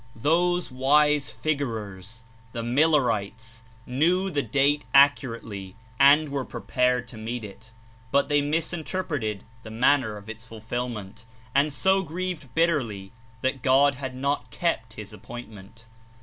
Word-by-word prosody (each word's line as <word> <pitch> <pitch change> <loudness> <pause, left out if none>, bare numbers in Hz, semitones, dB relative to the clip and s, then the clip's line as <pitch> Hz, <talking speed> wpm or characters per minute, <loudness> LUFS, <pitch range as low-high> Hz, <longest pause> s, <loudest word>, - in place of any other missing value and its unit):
3<^ - - -15
Those 175 +2 +2
wise 145 +2 +3
figurers, 115 -8 -4 0.3
the 115 -2 -4
''Millerites," 115 -5 +1 0.2
knew 175 +9 +1
the 145 -3 0
date 140 +1 +1
accurately 115 -8 +2 0.2
and 145 +2 +6
were 140 -1 -2
prepared 125 -1 0
to 115 - -11
meet 115 +1 -5
it, 105 +3 -13 0.4
but 140 - +3
they 145 -1 +2
misinterpreted 155 - -2 0.2
the 110 - -10
manner 115 -1 +2
of 100 0 -13
its 115 0 -8
fulfilment, 115 -1 -6 0.3
and 145 +2 +3
so 190 +6 +2
grieved 175 -4 -5
bitterly 130 - 0 0.3
that 130 +1 -1
God 140 +2 +4
had 130 -1 -6
not 140 +2 -2
kept 115 -10 -2
his 105 -1 -9
appoint 120 +3 -9
ment. 110 +2 -15
130 Hz, 135 wpm, -25 LUFS, 115-150 Hz, 0.4 s, and